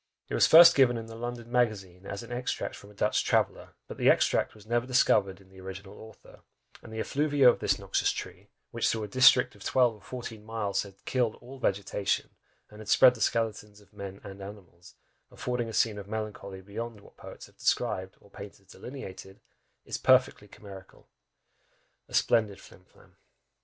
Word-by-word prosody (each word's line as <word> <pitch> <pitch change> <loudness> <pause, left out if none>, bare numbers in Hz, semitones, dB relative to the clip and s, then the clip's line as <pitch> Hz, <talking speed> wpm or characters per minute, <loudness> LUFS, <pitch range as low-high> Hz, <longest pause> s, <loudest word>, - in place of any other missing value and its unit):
It - - -6
was - - +4
first 170 +1 +9
given 125 -3 +4
in 115 - -6
the 115 0 -10
London 120 0 -6
Magazine, 100 -7 -1
as 100 +3 -6
an 115 - -12
extract 125 +1 -3
from 100 - -14
a 105 - -17
Dutch 105 +2 +1
traveller, - - -1
but - - -9
the - - +3
extract - - +2
was 105 -1 -16
never 120 +2 -1
discovered 105 -7 +2
in 95 -1 -21
the 95 0 -15
original 95 +2 -9
author, 110 -1 -15 0.4
and 115 - -13
"the 110 - -6
effluvia 145 +2 +2
of 120 - +5
this - - +1
noxious - - 0
tree, - - -8 0.2
which - - 0
through 110 -1 -1
a - - -4
district 130 +3 +5
of 100 - -14
twelve 125 -3 +2
or 105 - -17
fourteen 115 -3 -8
miles 110 -2 -2
had 100 -1 -13
killed 120 -4 0
all 130 +2 -13
vegetation, 100 -3 -1 0.4
and 105 - -13
had 110 -2 -10
spread 130 -1 +7
the 115 - -11
skeletons 105 -2 -1
of 105 -1 -23
men 100 -1 -8
and 100 0 -10
animals, 95 -4 -12 0.3
affording 125 -2 -3
a - - -6
scene 110 -1 +1
of 100 - -10
melancholy 105 -3 -6
beyond 110 +3 -7
what - - -19
poets - - -11
have - - -22
described, 95 0 -1
or 100 - -22
painters 100 -1 -11
delineated," 95 -7 -10 0.5
is - - -5
perfectly 130 -5 +3
chimerical. 95 -2 -14 1.0
A - - -7
splendid 110 -4 +2
flim 90 - -17
flam! - - -24
110 Hz, 190 wpm, -28 LUFS, 100-120 Hz, 1.0 s, first